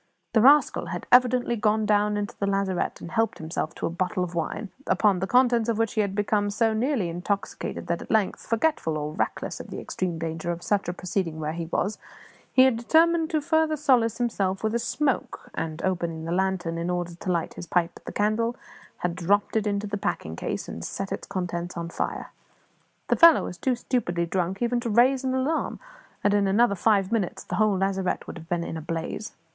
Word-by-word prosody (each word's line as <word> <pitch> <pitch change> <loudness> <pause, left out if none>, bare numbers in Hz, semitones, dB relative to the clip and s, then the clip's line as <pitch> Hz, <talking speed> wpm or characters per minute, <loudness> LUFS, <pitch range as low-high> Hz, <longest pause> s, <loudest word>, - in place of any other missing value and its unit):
The 220 - +5
rascal 285 +5 +5
had - - -5
evidently 250 -1 +4
gone 215 0 +1
down 210 0 +2
into 205 +2 -3
the 200 - -2
lazarette 195 -2 -1
and 170 - -8
helped 225 0 +1
himself 160 0 -4
to - - -3
a - - -1
bottle 180 +2 -1
of 180 -1 -5
wine, 170 +4 -3 0.2
upon 200 -4 +3
the 190 - -2
contents 240 -2 +3
of 225 - +1
which 225 -1 0
he 215 - +2
had 200 -2 -2
become 205 0 +1
so 220 +2 +1
nearly 230 -3 0
intoxicated 180 +4 -3
that 170 0 -2
at - - -10
length, 215 -3 0
forgetful 230 - +1
or 150 0 -4
reckless - - -2
of - - -8
the - - -6
extreme 180 -3 -3
danger 165 +1 -3
of 170 0 -6
such 200 -3 0
a - - -2
proceeding 175 -3 -3
where 155 0 -2
he 165 -1 -4
was, 200 +5 -1 0.5
he 260 - +6
had 260 -3 +4
determined 325 +6 +3
to 310 -4 0
further 315 0 +2
solace 250 -6 +3
himself 200 -6 -1
with 220 0 0
a 235 - +1
smoke, 270 +3 -2
and, 160 0 -4
opening 170 -3 -2
the 165 - -3
lantern 180 -2 0
in 170 +1 -2
order 175 -1 -2
to 180 +2 -3
light 170 -2 -1
his 175 - -8
pipe 175 -1 +1
at - - -16
the - - -5
candle, 220 +3 0 0.4
had 175 -1 -2
dropped 200 +5 +1
it 220 -1 +1
into 200 0 -1
the 205 0 -3
packing 80 - -3
case - - -4
and 85 - -7
set 195 - -4
its 195 - -4
contents 175 -2 -4
on 170 0 -4
fire. - - -4 0.8
The - - +4
fellow 335 -3 +8
was 180 - -6
too 260 -2 +1
stupidly 175 -9 -1
drunk 185 +4 -1
even 240 0 +1
to 240 -1 -3
raise 255 +4 +4
an 260 0 0
alarm, 275 +5 -1 0.4
and 205 - +3
in 205 -1 +3
another 205 +2 +4
five 200 0 +2
minutes 215 -6 -1
the 180 - -4
whole 210 -2 +3
lazarette 190 -1 -1
would - - -8
have 165 +1 -14
been 175 -2 0
in 165 - -5
a - - -5
blaze. 165 +6 -4
200 Hz, 215 wpm, -26 LUFS, 175-230 Hz, 0.8 s, fellow